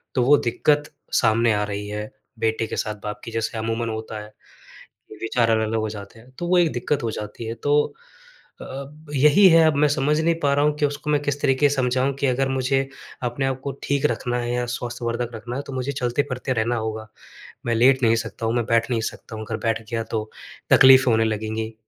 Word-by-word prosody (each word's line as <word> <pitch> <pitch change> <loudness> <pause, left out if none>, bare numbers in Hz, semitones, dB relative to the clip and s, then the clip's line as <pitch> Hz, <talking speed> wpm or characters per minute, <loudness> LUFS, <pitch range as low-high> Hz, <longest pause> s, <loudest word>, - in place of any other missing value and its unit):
तो 125 - +3
वो 145 +3 +6
दिक्कत 145 +5 +1 0.3
सामने 115 0 +3
आ 105 0 0
रही 105 0 -4
है, 105 +1 -5 0.3
बेटे 110 0 0
के - - -5
साथ 105 - -2
बाप 105 0 -5
की। 115 - -6
जैसे 115 0 -2
अमूमन 115 +1 -2
होता 110 0 -5
है, 105 0 -14 0.9
विचार 115 +1 +1
अलग-अलग 110 0 +1
हो 110 0 -2
जाते 105 +1 -9
हैं, 120 +3 -18
तो 175 +7 -6
वो 180 +1 +3
एक 170 -3 +3
दिक्कत 125 +3 -1
हो 115 - -1
जाती 105 +2 -8
है। 115 - -3
तो 145 +1 +2 0.7
अ, - - -7
अब 140 +4 -9
यही 150 +8 +6
है, 165 -1 +6
अब 155 - +2
मैं - - +6
समझ 145 +2 +1
नहीं 165 +1 +2
पा 140 -1 +3
रहा 145 +1 +3
हूँ 150 - +2
कि 150 - +2
उसको 145 +1 -4
मैं 150 -1 +2
किस 145 0 -1
तरीक़े 140 +1 +3
से 145 - -1
समझाऊँ 130 +1 +1
कि 140 - +1
अगर 135 +1 +1
मुझे 135 +1 +1 0.4
अपने 125 +3 -1
आप 130 -1 -1
को 140 - -2
ठीक 140 -1 0
रखना 120 +1 -2
है 120 0 -2
या 125 0 -1
स्वास्थ्यवर्धक 120 0 -3
रखना 120 +3 -6
है, 140 - -2
तो 140 - -9
मुझे 130 +2 -2
चलते-फिरते 130 0 -2
रहना 115 0 0
होगा। 110 -1 -4 0.6
मैं 115 - +1
लेट 130 +3 +4
नहीं 115 -1 +5
सकता 115 0 -4
हूँ, 115 - 0
मैं 120 -2 0
बैठ 115 +1 +1
नहीं 115 -2 +1
सकता 110 - -12
हूँ। 110 0 -6
अगर 110 +1 -3
बैठ 115 -1 0
गया, 115 -1 -1
तो 110 -1 -4 0.4
तकलीफ़ 130 0 +8
होने 115 0 +3
लगेंगी 110 +1 -3
120 Hz, 225 wpm, -23 LUFS, 110-140 Hz, 0.9 s, तकलीफ़